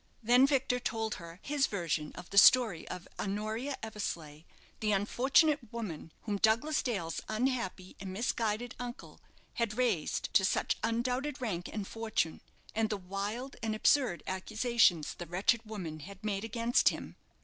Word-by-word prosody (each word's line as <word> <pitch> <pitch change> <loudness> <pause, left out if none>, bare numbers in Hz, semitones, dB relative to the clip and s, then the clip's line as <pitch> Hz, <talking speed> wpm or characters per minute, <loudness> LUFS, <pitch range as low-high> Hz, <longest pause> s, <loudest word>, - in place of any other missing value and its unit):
Then 245 +4 +6
Victor 265 -3 +1
told 225 -2 -2
her 170 0 -10
his 285 -1 +1
version 165 -6 -2
of 180 - -10
the 200 - +7
story 220 -7 +6
of 180 - -7
Honoria 215 +7 -2
Eversleigh, 170 -8 -5 0.3
the 215 -1 +1
"unfortunate 260 - +3
woman," 190 -9 -5
whom 205 -2 -1
Douglas 230 +9 +3
Dale's 185 -10 -2
unhappy 220 -5 -2
and 190 -1 -6
misguided 225 +2 -1
uncle 245 0 -8 0.3
had 230 -2 -1
raised 225 -11 0
to 190 - +5
such 190 - +1
undoubted 250 +5 -1
rank 190 -9 -3
and 210 -3 -4
fortune, 220 -8 -2 0.3
and 220 0 +1
the 210 - -1
wild 200 +8 -4
and 220 -1 -1
absurd 235 -4 +3
accusations 200 - +2
the 175 - -8
wretched 190 +7 +2
woman 180 -8 -6
had 195 +6 -10
made 200 -1 -1
against 230 +2 +3
him. - - -7
215 Hz, 150 wpm, -32 LUFS, 190-245 Hz, 0.3 s, the